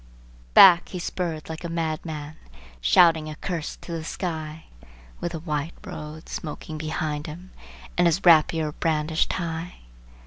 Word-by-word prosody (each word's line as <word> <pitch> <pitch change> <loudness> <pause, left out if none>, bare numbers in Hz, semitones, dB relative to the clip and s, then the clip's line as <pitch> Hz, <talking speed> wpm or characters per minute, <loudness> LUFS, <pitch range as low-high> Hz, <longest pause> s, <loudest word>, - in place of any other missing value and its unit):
Back, 180 -2 +8
he 185 - -5
spurred 170 -3 -3
like 160 +1 -7
a 170 - -4
madman, 155 -2 -4 0.5
shrieking 160 - +5
a 155 - -6
curse 165 -1 -4
to - - -11
the 165 -1 -3
sky, 160 -2 -5 0.5
With 175 - -3
the 165 - -4
white 155 0 -3
road 155 +1 -8
smoking 155 0 -6
behind 155 -1 -3
him 175 +5 -9 0.5
and 175 - +6
his 170 +4 0
rapier 160 -2 +5
brandished 155 0 0
high! 170 0 -4
160 Hz, 140 wpm, -25 LUFS, 155-170 Hz, 0.5 s, Back